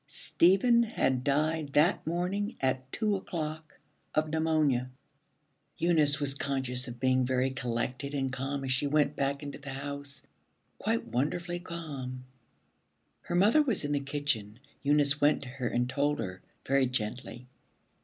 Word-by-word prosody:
Stephen 190 - +3
had 135 - 0
died 150 +1 0
that 155 +3 +3
morning 190 +6 -1
at 130 0 -1
two 215 -2 0
o'clock 160 -4 -5 0.4
of 155 0 +2
pneumonia. 155 -5 +1 0.9
Eunice 155 -4 +4
was 140 -2 +2
conscious 135 -2 -2
of 120 -1 -8
being 130 0 +3
very 130 +1 +1
collected 125 +3 -3
and 135 -2 -1
calm 135 +1 -3
as 130 - -2
she 130 +3 +1
went 150 0 +2
back 140 +1 -1
into 145 0 -7
the 140 -1 -9
house; 140 0 -5 0.6
quite 225 +2 0
wonderfully 175 +7 -2
calm. 140 -8 -6 1.0
Her 175 - -4
mother 210 +12 +5
was 245 - +1
in 145 - -2
the 145 - +2
kitchen. 140 -7 -2 0.2
Eunice 145 0 +3
went 145 0 +3
to 130 - -8
her 125 -1 -3
and 120 +1 0
told 145 +3 0
her 95 -4 -5 0.2
very 135 -1 +3
gently. 120 +1 -3
140 Hz, 145 wpm, -30 LUFS, 130-160 Hz, 1.0 s, mother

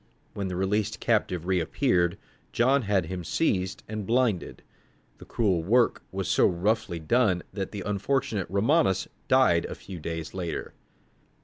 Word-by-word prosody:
When 100 -1 -3
the 90 - -4
released 95 +2 0
captive 90 -2 0
reappeared, 90 - +1 0.3
John 130 +4 +3
had 100 -5 +1
him 90 +2 -5
seized 95 - -1
and 110 0 -4
blinded. 115 -6 0 0.6
The - - -11
cruel 95 -7 +1
work 115 +8 +2
was - - -3
so - - +4
roughly 95 +1 0
done 95 +2 +2
that 95 -1 -3
the 100 -2 -5
unfortunate 105 -1 -1
Romanus 105 - +2 0.2
died - - +4
a - - -6
few 95 -3 -9
days 80 0 -5
later. 90 -3 -4
95 Hz, 140 wpm, -27 LUFS, 90-115 Hz, 0.6 s, so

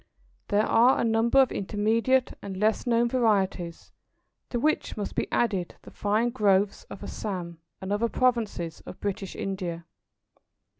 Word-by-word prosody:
There 210 +1 +2
are 245 +3 +5
a - - +1
number 230 +3 +3
of 265 - +5
intermediate 225 +6 +1
and 195 -1 -6
less 215 +5 +1
known 235 0 +3
varieties, 200 -8 0 0.6
to 240 - -1
which 305 -2 0
must 205 - -4
be - - -2
added 195 -7 0
the - - -12
fine 215 +4 0
growths 200 -2 +2
of - - -10
Assam 175 -5 -5 0.2
and 190 +1 -2
other 230 +3 +1
provinces 225 -11 0
of - - -9
British 195 -2 -4
India. 180 -4 -4
210 Hz, 145 wpm, -27 LUFS, 190-235 Hz, 0.6 s, are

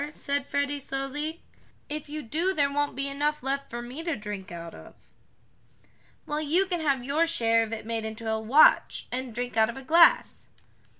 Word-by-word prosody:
said 280 -1 -2
Freddie 285 0 -1
slowly. 280 +4 -4 0.4
"If 300 0 -6
you 305 0 -5
do 335 +10 -1
there 280 -2 +2
won't 290 -2 0
be 275 +1 -2
enough 290 +1 -1
left 275 +1 -2
for 240 0 -5
me 250 +6 -7
to 330 -2 -2
drink 210 -2 -7
out 170 -1 -8
of." - - -13 1.3
"Well, 300 +1 -2
you 330 +6 +2
can 355 -3 -2
have 275 -5 +1
your 300 +6 +1
share 230 -8 +3
of 225 -1 -3
it 225 -1 -5
made 225 -1 -2
into 220 +1 -6
a 220 0 0
watch, 245 +8 +4
and 255 0 -4
drink 245 +1 -4
out 220 0 +4
of 235 - -6
a 270 - -8
glass." 335 - +4
275 Hz, 190 wpm, -27 LUFS, 230-300 Hz, 1.3 s, watch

